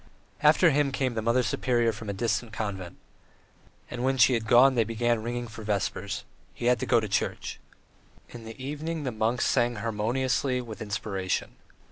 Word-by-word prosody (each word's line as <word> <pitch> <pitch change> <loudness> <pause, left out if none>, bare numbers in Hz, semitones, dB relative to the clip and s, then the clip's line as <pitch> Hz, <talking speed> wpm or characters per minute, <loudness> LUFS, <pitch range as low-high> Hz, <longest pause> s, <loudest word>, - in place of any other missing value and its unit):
After 155 +3 +5
him 145 0 +2
came 130 -2 -1
the 110 - -2
Mother 115 +3 +2
Superior 120 +1 +1
from 110 -1 -8
a - - -1
distant 115 +2 -1
convent. 100 -5 -5 0.9
And 125 0 -4
when 135 +1 +1
she 125 +1 +6
had 115 -2 -1
gone 130 +4 +6
they 120 -3 +3
began 115 +1 0
ringing 120 +1 -3
for 110 0 -10
vespers. 100 0 -2 0.3
He - - -5
had 125 -1 +3
to - - -3
go 120 - +4
to 110 - -3
church. - - -2 0.7
In 120 -1 -10
the 115 +3 -10
evening 150 +4 -4
the 130 - -2
monks 110 +2 0
sang 120 0 +2
harmoniously, 125 +4 0
with 115 -3 -8
inspiration. 100 -3 -2
120 Hz, 175 wpm, -27 LUFS, 110-125 Hz, 0.9 s, she